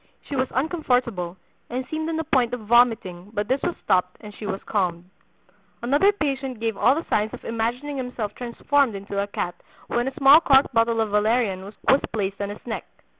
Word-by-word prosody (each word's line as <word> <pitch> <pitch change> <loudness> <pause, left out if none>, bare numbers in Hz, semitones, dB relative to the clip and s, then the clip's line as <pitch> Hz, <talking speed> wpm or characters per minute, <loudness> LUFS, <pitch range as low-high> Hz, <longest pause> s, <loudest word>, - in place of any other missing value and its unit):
She 285 - -4
was 255 0 +1
uncomfortable, 250 - -1 0.3
and 255 +2 -3
seemed 315 +2 -3
on 325 - -2
the 320 - -1
point 255 -6 +1
of 245 - -9
vomiting, 215 -5 +2
but 205 0 -1
this 260 +3 +1
was 350 - -1
stopped, 180 0 +1
and 210 -1 -10
she 210 - -7
was 195 - -4
calmed." 180 -4 -1 0.8
Another 285 +11 +4
patient 270 - -3
gave 225 -1 -1
all 255 +6 +4
the 325 - -3
signs 215 +1 0
of - - -15
imagining 240 +6 -2
himself 250 -5 -4
transformed 250 +1 0
into 200 0 -3
a 200 - -2
cat 175 -3 -3 0.3
when 240 +2 -1
a 265 - -3
small 280 +3 +7
corked 270 -3 +4
bottle 230 0 +2
of 220 -2 -1
valerian 210 -2 +1
was 200 +2 -10 0.4
placed 200 -2 -2
on 200 - -2
his 205 - -9
neck. 235 - -4
235 Hz, 195 wpm, -24 LUFS, 205-270 Hz, 0.8 s, small